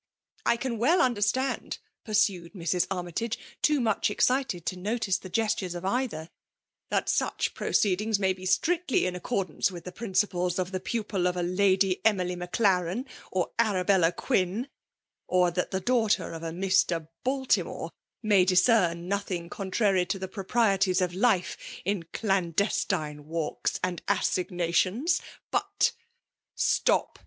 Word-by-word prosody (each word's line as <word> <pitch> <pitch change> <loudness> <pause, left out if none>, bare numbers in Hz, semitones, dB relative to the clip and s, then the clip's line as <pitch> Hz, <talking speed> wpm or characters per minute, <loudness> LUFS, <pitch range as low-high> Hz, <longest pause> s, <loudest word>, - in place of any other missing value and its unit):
'' - - -35
I 235 - +4
can 240 -2 -3
well 320 +10 +4
understand," 250 +2 0
— - - -57
pursued 200 -5 +1
Mrs. 175 -1 0
Armytage, 190 +5 -3 0.2
too 300 -1 +3
much 220 -5 +1
excited 250 -5 +1
to - - -2
notice 200 +1 -1
the 185 - -10
gestures 190 -3 -1
of 175 +1 -6
either, 200 -7 -2 0.2
— - - -64
" - - -62
that - - 0
such - - 0
proceedings 210 +2 +1
may 190 -1 +1
be 185 0 -7
strictly 345 - +2
in 180 0 -2
accordance 180 -2 -1
with 175 -3 -9
the 180 - -7
prin 210 +1 -7
ciples 180 -2 +1
of 185 0 -2
the 185 - -2
pupil 195 -2 -1
of 180 0 -1
a 175 - 0
Lady 190 +1 +2
Emily 185 -5 +2
Maclaren, 180 +3 0 0.3
or 185 -2 -1
ArabeUa 190 -5 +3
Quin, 220 +2 0 0.3
— - - -63 0.2
or 180 -1 +3
that 180 +1 -1
the 190 - -1
daughter 220 -1 +1
of 165 - -7
a 165 - -3
Mr. 180 -2 +1 0.2
Baltimore 265 0 0 0.3
may 205 -4 +5
discern 180 -2 +3
nothing 185 -3 -3
contrary 195 -3 +1
to 195 - -1
the 190 0 -5
proprieties 195 -1 +1
of 180 -1 +1
lifi^ 190 -1 +1 0.3
in 195 -3 -1
clandestine 175 -5 -1
walks 160 -1 -2
and 180 -1 -1
assignations; 185 - +1 0.3
but - - +1 0.3
'' - - -63
*' - - -64
Stop - - +1
190 Hz, 155 wpm, -28 LUFS, 180-220 Hz, 0.3 s, may